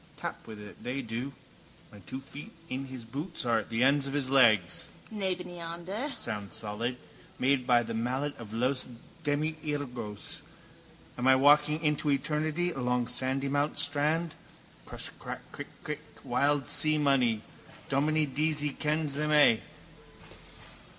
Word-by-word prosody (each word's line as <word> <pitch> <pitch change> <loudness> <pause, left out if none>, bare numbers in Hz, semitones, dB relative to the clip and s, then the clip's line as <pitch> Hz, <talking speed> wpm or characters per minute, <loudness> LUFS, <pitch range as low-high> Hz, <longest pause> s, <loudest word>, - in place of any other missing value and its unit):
Tap - - -6
with 110 -1 -8
it: 105 -3 -11
they 130 +2 -2
do. 120 +4 -4 0.6
My 105 - -12
two 130 +7 -7
feet 140 +2 -10 0.2
in 130 +1 -3
his 130 -3 -7
boots 145 +6 -4
are 115 -2 +3
at 110 - -7
the 115 +1 +1
ends 140 +1 +4
of 135 - -4
his 135 -2 0
legs, 110 -9 +4 0.3
nebeneinander. 185 - -3
Sounds 100 -4 -4
solid: 115 +4 -2 0.4
made 130 -1 +2
by 120 -1 +5
the 115 0 -5
mallet 130 +6 -1
of 110 -3 -9
Los 125 +4 0 0.4
Demiurgos. 145 -7 -2 0.8
Am 125 - +1
I 130 - +8
walking 150 +3 +5
into 150 -1 +1
eternity 155 +4 0
along 125 -3 0
Sandymount 135 +3 +1
strand? 155 +3 +3 0.5
Crush, - - 0
crack, - - -6
crick, - - -7 0.2
crick. - - -4 0.2
Wild 145 -1 +2
sea 155 0 +4
money. 130 -7 +3 0.4
Dominie 155 +3 +2
Deasy 150 +1 +1
kens 150 0 0
them 150 +2 0
a'. 145 -7 +6
140 Hz, 135 wpm, -30 LUFS, 125-150 Hz, 0.8 s, I